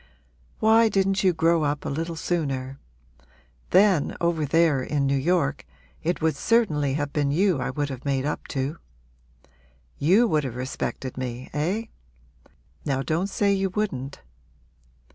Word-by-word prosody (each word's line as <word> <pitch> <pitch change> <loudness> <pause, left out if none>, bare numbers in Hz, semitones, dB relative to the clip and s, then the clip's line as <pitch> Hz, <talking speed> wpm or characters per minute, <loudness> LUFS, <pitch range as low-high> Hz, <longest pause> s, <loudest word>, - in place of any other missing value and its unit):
Why 225 +1 +5
didn't 195 -1 +1
you 185 - +5
grow 165 0 +2
up 145 -1 -1
a - - -2
little 165 +3 -3
sooner? 140 -6 -2 0.9
Then, 190 -5 +3
over 170 -3 0
there 160 -2 +3
in 140 +1 -1
New 140 0 +2
York, 145 0 0 0.4
it 170 0 -2
would 160 -1 +2
certainly 150 - +1
have 145 -1 -3
been 145 -2 +1
you 175 +1 +2
I - - -2
would 145 +1 -2
have 130 -2 -7
made 135 -1 0
up 150 - -3
to. 140 +3 -3 1.2
You 195 +11 +4
would 155 -7 +1
have 130 -4 -5
respected 130 0 -4
me 125 0 -5
eh? 175 +10 -1 1.0
now 135 -1 -1
don't 160 +8 0
say 200 0 +1
you 195 0 0
wouldn't.' 145 -10 -3
155 Hz, 145 wpm, -25 LUFS, 140-185 Hz, 1.2 s, Why